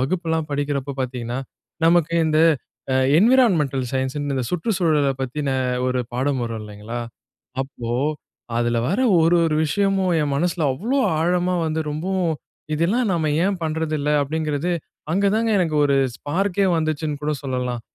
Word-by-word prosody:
வகுப்புல்லாம் 160 Hz, +2 st, -1 dB
படிக்கிறப்ப 140 Hz, -1 st, -2 dB
பாத்தீங்கன்னா, 125 Hz, -1 st, -4 dB, 0.5 s
நமக்கு 170 Hz, 0 st, +4 dB
இந்த, 155 Hz, 0 st, +2 dB, 0.5 s
அ -, -, +2 dB, 0.2 s
என்விரான்மென்டல் 180 Hz, -, +3 dB
சயன்ஸ்ன்னு, 135 Hz, +2 st, -1 dB
இந்த 130 Hz, -, -1 dB
சுற்றுச்சூழலைப் 160 Hz, -, +1 dB
பத்தின 140 Hz, +2 st, -3 dB, 0.4 s
ஒரு 130 Hz, 0 st, 0 dB
பாடம் 130 Hz, 0 st, 0 dB
வரும் 115 Hz, -1 st, -4 dB
இல்லைங்களா? 105 Hz, +3 st, -6 dB, 0.6 s
அப்போ 120 Hz, -3 st, -7 dB, 0.7 s
அதில 120 Hz, 0 st, +1 dB
வர 195 Hz, -, 0 dB, 0.2 s
ஒரு 165 Hz, +2 st, +4 dB
ஒரு 160 Hz, -, +1 dB
விஷயமும் 195 Hz, +2 st, +1 dB
என் 145 Hz, -1 st, 0 dB
மனசுல 170 Hz, +1 st, 0 dB
அவ்வளோ 230 Hz, -, -1 dB, 0.2 s
ஆழமா 180 Hz, +2 st, +1 dB
வந்து 160 Hz, 0 st, -1 dB
ரொம்பவும், 170 Hz, +2 st, -1 dB, 0.4 s
"இதெல்லாம் 205 Hz, +10 st, +1 dB
நாம 160 Hz, -3 st, 0 dB
ஏன் 195 Hz, -1 st, +1 dB
பண்றதில்ல?" 155 Hz, -2 st, -1 dB
அப்படிங்கிறது, 155 Hz, +2 st, -2 dB, 0.4 s
அங்க 200 Hz, +2 st, +2 dB
தாங்க 225 Hz, +1 st, +1 dB
எனக்கு 165 Hz, -4 st, +1 dB
ஒரு 140 Hz, -1 st, +3 dB, 0.2 s
ஸ்பார்க்கே 195 Hz, +5 st, 0 dB
வந்துச்சுன்னு 155 Hz, -2 st, -2 dB
கூட 150 Hz, +1 st, 0 dB
சொல்லலாம். 125 Hz, -3 st, -2 dB
155 Hz, 135 wpm, -22 LUFS, 135-175 Hz, 0.7 s, நமக்கு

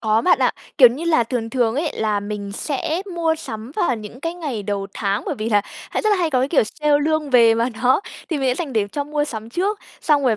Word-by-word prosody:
Có 220 Hz, 0 st, +2 dB
bạn 360 Hz, +8 st, +4 dB
ạ, -, -, +3 dB, 0.3 s
kiểu 255 Hz, -4 st, +10 dB
như 265 Hz, +8 st, -5 dB
là, 315 Hz, -9 st, +3 dB
thường 225 Hz, -1 st, -3 dB
thường 235 Hz, -2 st, +1 dB
ấy 305 Hz, +2 st, 0 dB
là 210 Hz, -2 st, 0 dB
mình 205 Hz, -1 st, -5 dB
sẽ 315 Hz, -, -2 dB
mua 330 Hz, -2 st, +1 dB
sắm 225 Hz, -7 st, -7 dB
vào 255 Hz, -8 st, +1 dB
những 215 Hz, +3 st, -10 dB
cái 330 Hz, +3 st, -3 dB
ngày 285 Hz, -12 st, -4 dB
đầu 200 Hz, -1 st, -2 dB
tháng, 200 Hz, -1 st, -1 dB
bởi -, -, -1 dB
vì 215 Hz, +1 st, -2 dB
là 210 Hz, -2 st, +4 dB, 0.3 s
hãy -, -, -1 dB
rất 430 Hz, -, +2 dB
là 410 Hz, -, +4 dB
hay 340 Hz, -4 st, 0 dB
có, 255 Hz, -, +2 dB
cái 260 Hz, -, +1 dB
kiểu, 290 Hz, -, +4 dB
sale 295 Hz, +6 st, +1 dB
lương 310 Hz, -2 st, 0 dB
về 230 Hz, -2 st, +6 dB
mà 230 Hz, +2 st, +1 dB
nó 255 Hz, +5 st, +4 dB, 0.3 s
thì 320 Hz, -, -1 dB
mình 265 Hz, -1 st, +1 dB
sẽ -, -, +1 dB
dành 300 Hz, -1 st, -4 dB
để 215 Hz, -3 st, +1 dB
cho 285 Hz, -, -2 dB
mua 295 Hz, 0 st, -1 dB
sắm 225 Hz, -5 st, -6 dB
trước. 395 Hz, -, -1 dB, 0.2 s
Xong 295 Hz, -2 st, +3 dB
rồi 225 Hz, -4 st, +3 dB
255 Hz, 265 wpm, -21 LUFS, 220-310 Hz, 0.3 s, kiểu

